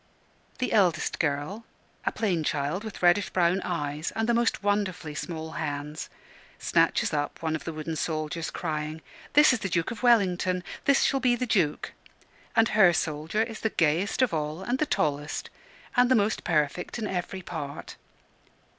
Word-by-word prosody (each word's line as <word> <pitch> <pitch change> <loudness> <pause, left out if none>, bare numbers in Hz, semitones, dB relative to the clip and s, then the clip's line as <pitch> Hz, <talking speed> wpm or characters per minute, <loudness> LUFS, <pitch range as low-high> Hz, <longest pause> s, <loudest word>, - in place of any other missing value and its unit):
The 250 - -1
eldest 185 -6 +2
girl, 150 +8 -1 0.4
a - - +3
plain 185 -8 0
child 150 +6 -1
with 220 -4 -8
reddish 175 +3 +4
brown 180 +1 +2
eyes, 150 -3 -3
and 225 0 0
the 235 - +3
most 235 -3 +1
wonderfully 200 -6 -1
small 160 0 -5
hands, 150 -1 -4 0.5
snatches - - +2
up 145 +2 -2
one 160 -1 0
of 145 -2 -6
the 165 - -3
wooden 155 +1 -4
soldiers, 155 +1 -2
crying, 155 +1 -4 0.3
"This 295 -2 +7
is 250 - 0
the 195 - -3
Duke 170 +2 0
of 230 - -7
Wellington! 185 -6 +3 0.2
This 280 -1 +4
shall 270 - +2
be 250 -2 +3
the 250 - -2
Duke!" 180 -10 0 0.6
and 225 +1 +4
her 200 -5 +6
soldier 160 +7 0
is 225 -1 -6
the 220 - 0
gayest 170 - +1
of 250 - +1
all, 155 +3 -2
and 245 +5 -1
the 305 - +1
tallest, 150 0 -1 0.4
and 245 -1 +5
the 260 - +5
most 210 -1 +1
perfect 155 +3 0
in 225 - -3
every 185 -1 -3
part. 150 -5 -6
175 Hz, 170 wpm, -27 LUFS, 155-215 Hz, 0.6 s, This